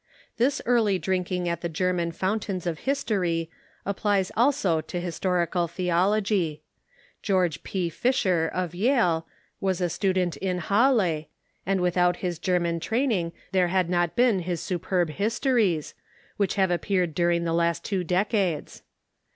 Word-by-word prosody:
This 260 +4 +1
early 225 -5 +3
drinking 180 -1 -1
at 170 -1 -2
the 170 - -2
German 175 +1 0
foun 190 +6 -1
tains 190 -4 -5
of 165 -3 -2
history 180 - 0 0.3
applies 200 -1 0
also 230 - +2
to 175 - -5
historical 175 0 0
theology. 180 -1 0 0.6
George 180 -7 +1
P. 185 -3 -2
Fisher, 180 -4 +1
of 180 -2 -3
Yale, 180 -6 +2 0.3
was 190 -2 0
a 175 -2 0
student 185 -2 0
in 185 -2 -2
Ilalle, 200 - +2 0.4
and 195 -1 +1
without 180 0 +2
his 175 -3 -4
Ger 180 0 +1
man 170 -1 -1
training 220 - 0 0.2
there 185 -2 +3
had 180 -1 +1
not 175 -2 +1
been 240 -5 +3
his 175 -1 -3
superb 175 -1 -1
Histories, 215 - 0 0.4
which 200 -3 0
have 190 -2 +2
appeared 175 -1 0
during 170 +1 +1
the 165 -1 -1
last 170 0 0
two 190 -3 -1
decades. 185 -1 -1
180 Hz, 145 wpm, -26 LUFS, 170-200 Hz, 0.6 s, early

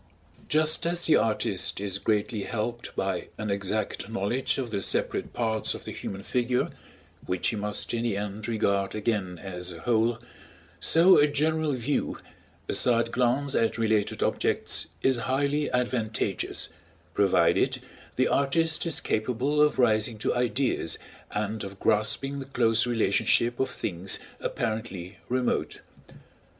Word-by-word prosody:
Just 155 +2 +3
as 175 0 +1
the 155 - +6
artist 110 -3 0
is 100 -1 -3
greatly 105 0 0
helped 120 +2 -4
by 95 -2 -1
an 105 -1 -2
exact 100 +1 -2
knowledge 115 +4 -1
of 125 -4 -3
the 100 -2 -1
separate - - -1
parts 110 -2 0
of - - -10
the - - -5
human 100 0 -6
figure, 125 +2 0 0.6
which 90 -1 0
he - - -2
must 105 +2 -1
in 115 - 0
the 115 -4 0
end 105 +1 -4
regard 100 -4 0
again 105 -5 -1
as 90 0 -6
a 85 -1 -9
whole, 115 +1 +2 0.6
so 175 +4 +6
a 145 - +6
general 155 +1 +1
view, 130 +3 -1 0.5
a - - -1
side 115 -1 +3
glance 130 +3 +1
at 115 -3 +1
related 110 -2 +1
objects, - - +1 0.2
is 130 -2 +3
highly 145 +2 +1
advantageous, 115 -6 -1 0.4
provided - - +3 0.4
the - - +3
artist 160 +4 +1
is 165 - -1
capable 125 +7 0
of 150 0 +3
rising 110 -2 +2
to 105 - 0
Ideas 120 -7 0 0.3
and 105 +1 -2
of 100 0 -8
grasping 110 +7 +1
the 135 - -6
close 115 -3 +2
relationship 115 +1 +2
of 130 - +1
things 90 0 -2 0.2
apparently 105 -5 -4
remote. 125 0 -1
115 Hz, 140 wpm, -27 LUFS, 105-130 Hz, 0.6 s, the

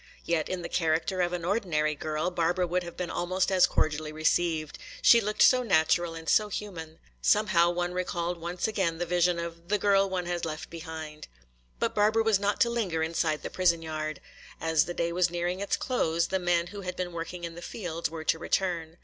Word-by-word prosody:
Yet 165 -2 0
in 185 -2 -3
the - - -3
character 165 +2 0
of 175 0 +1
an 175 -1 -3
ordinary 170 -7 0
girl 155 +3 -2
Barbara 175 +1 +1
would 180 +1 0
have 170 -1 -9
been 180 -2 -3
almost 185 +2 0
as 185 -1 +5
cordially 155 0 -1
received. 155 0 0 0.2
She 235 - +7
looked 210 0 +2
so 255 -1 +6
natural 170 -5 +2
and 165 0 -9
so 210 -1 +3
human. 165 -7 -6 0.2
Somehow 180 -5 +4
one 175 0 -2
recalled 175 -1 -2
once 175 +3 -2
again 190 -6 -1
the 175 - -2
vision 175 0 +2
of 170 0 -6
"the 210 - +3
girl 195 -1 +3
one 185 -2 -2
had 175 -1 -3
left 155 -2 -5
behind." 160 -2 -8 0.5
But - - -1
Barbara 215 +2 +3
was 220 -3 +3
not 205 +1 0
to 235 - +5
linger 185 -9 -1
inside 160 -1 -1
the - - -5
prison 170 -3 +2
yard. 155 -2 -4 0.4
As 160 -1 +2
the 175 - -5
day 170 0 -1
was 175 0 +2
nearing 175 +1 -2
its 200 - 0
close 170 -9 0
the 190 - 0
men 175 -1 +1
who 205 - -6
had 180 -1 -5
been 180 -1 -3
working 170 +1 -6
in 170 -1 -4
the 175 - -10
fields 170 -3 -4
were 160 0 -6
to 160 - +1
return. 170 -2 -1
175 Hz, 210 wpm, -28 LUFS, 165-185 Hz, 0.5 s, She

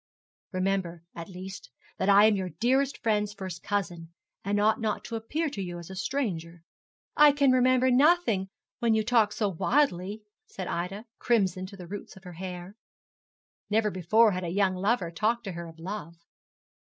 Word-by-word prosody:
Remember, 185 -3 -1
at 170 +1 -8
least, 185 -5 -9 0.3
that 190 - +1
I 200 +1 +7
am 215 -1 +4
your 190 -2 -2
dearest 265 +3 +2
friend's 210 -2 +1
first 185 -4 -6
cousin, 175 -5 -3 0.3
and 205 +1 0
ought 215 +2 +2
not 215 -1 -1
to 230 - -6
appear 300 +9 -2
to 200 - -5
you 175 -2 -5
as 170 +2 -9
a - - -7
stranger.' 175 -8 -3 0.5
'I 295 -1 +8
can 280 -2 +4
remember 255 0 +4
nothing 250 - +3 0.3
when 230 -2 +2
you 220 - +2
talk 225 -2 +3
so 210 -1 0
wildly,' 200 - 0 0.2
said 190 - -6
Ida, 190 +6 -4
crimson 190 -6 +1
to 195 +1 -12
the 180 - -9
roots 200 +3 -8
of 190 - -15
her 180 -1 -9
hair. 180 +1 -7 1.0
Never 215 0 +2
before 210 +5 +4
had 185 -1 -3
a 170 - -3
young 190 +1 +2
lover 190 -1 0
talked 220 +7 0
to 195 - -5
her 170 -1 -7
of 165 0 -13
love. 170 -1 -6
200 Hz, 180 wpm, -28 LUFS, 180-225 Hz, 1.0 s, I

